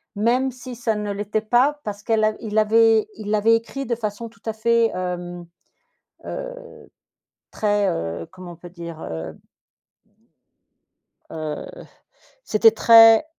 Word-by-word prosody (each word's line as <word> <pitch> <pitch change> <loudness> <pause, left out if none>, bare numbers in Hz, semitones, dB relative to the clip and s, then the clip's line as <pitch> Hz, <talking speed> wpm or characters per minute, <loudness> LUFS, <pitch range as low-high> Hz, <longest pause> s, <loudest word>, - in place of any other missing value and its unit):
même 245 +5 +1
si 250 0 -10
ça 225 -2 -1
ne 210 -1 -3
l'était 205 +2 -2
pas 255 +7 +2
parce 205 -1 -6
qu'elle 220 0 0
a 215 0 +2
il 215 -1 -4
avait 220 0 +4
il 215 -1 -7
l'avait 215 +2 +3
écrit 250 +4 -4
de 235 - -1
façon 225 0 -5
tout 230 - -25
à 220 - -2
fait, 230 +1 +2
hem, 175 -1 -5 0.8
heu, - - -5 1.0
très 205 -2 +1
heu, 85 - -4
comment 185 -1 -10
on - - -13
peut 175 +2 -12
dire? 170 -2 -9
Heu 80 -1 -6 2.0
heu, 155 -2 -5 0.8
c'était 225 - +4
très 225 +2 +7
215 Hz, 140 wpm, -22 LUFS, 185-230 Hz, 2.0 s, très